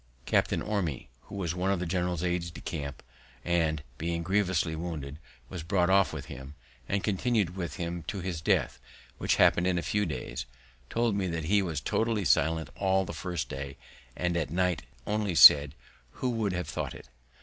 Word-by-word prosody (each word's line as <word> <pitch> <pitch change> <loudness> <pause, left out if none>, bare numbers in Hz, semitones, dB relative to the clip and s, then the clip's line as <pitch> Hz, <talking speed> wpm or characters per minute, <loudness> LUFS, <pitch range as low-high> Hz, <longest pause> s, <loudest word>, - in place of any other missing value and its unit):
Captain - - +1
Orme, 95 - -2 0.2
who - - -9
was 90 -4 -2
one 90 +2 -1
of 100 -2 +1
the 90 - -2
general's 90 -1 -1
aids 90 -1 -1
de 85 - -10
camp, 70 -4 -5 0.4
and, 80 -3 +1 0.2
being 85 +1 -2
grievously 95 -3 +1
wounded, 80 -4 -5 0.3
was 90 -3 -6
brought 90 +1 +1
off 100 0 +4
with - - -6
him, 65 +3 -9 0.3
and 100 0 0
continu'd 105 -3 0
with 90 -3 -4
him 85 0 -4
to 100 - -3
his 90 -3 -4
death, - - +1 0.4
which - - +2
happen'd 85 +1 +4
in 90 -1 +1
a 85 - -1
few 105 -1 0
days, - - -5 0.4
told 115 -1 +1
me 100 -2 0
that 85 -2 -3
he 100 +4 +3
was 85 -5 -2
totally 110 - 0
silent 80 -2 +2
all 95 -1 +2
the - - -6
first 85 -1 -3
day, 70 0 -6 0.4
and 85 -1 -1
at 80 -5 -1
night 90 +1 0 0.2
only 105 -3 -1
said, 75 -2 +9 0.4
"_Who 125 - -1
would 110 -5 -1
have 90 -3 -3
thought 70 - -4
it? - - -12
90 Hz, 185 wpm, -29 LUFS, 80-95 Hz, 0.4 s, said